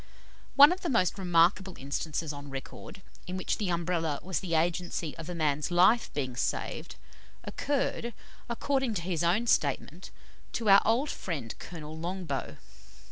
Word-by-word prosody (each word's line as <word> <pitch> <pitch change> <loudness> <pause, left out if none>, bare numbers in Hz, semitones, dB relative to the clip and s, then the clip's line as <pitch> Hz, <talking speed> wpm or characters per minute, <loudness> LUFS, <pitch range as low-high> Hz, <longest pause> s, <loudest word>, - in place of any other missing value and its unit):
One 285 +3 +10
of 370 +1 -2
the 345 - -2
most 200 - +2
remarkable 180 +1 +3
instances 150 +3 -3
on 145 0 -9
record, 135 +7 -8 0.2
in 180 +1 -4
which 185 - -2
the 205 -4 -1
Umbrella 170 -3 -1
was 185 -3 -1
the 170 -3 -2
agency 170 -1 -1
of 165 +1 -7
a 180 - -4
man's 150 -2 0
life 185 +7 +4
being 130 -4 -2
saved, - - -3 0.5
occurred, 270 -4 -2 0.4
according 265 0 0
to 170 - -2
his 175 -2 -1
own 185 +8 +2
statement, - - 0 0.4
to 225 -3 0
our 195 0 +9
old 245 +7 +2
friend 140 - -4
Colonel 155 -3 -8
Longbow. 175 +2 -4
175 Hz, 150 wpm, -29 LUFS, 160-205 Hz, 0.5 s, One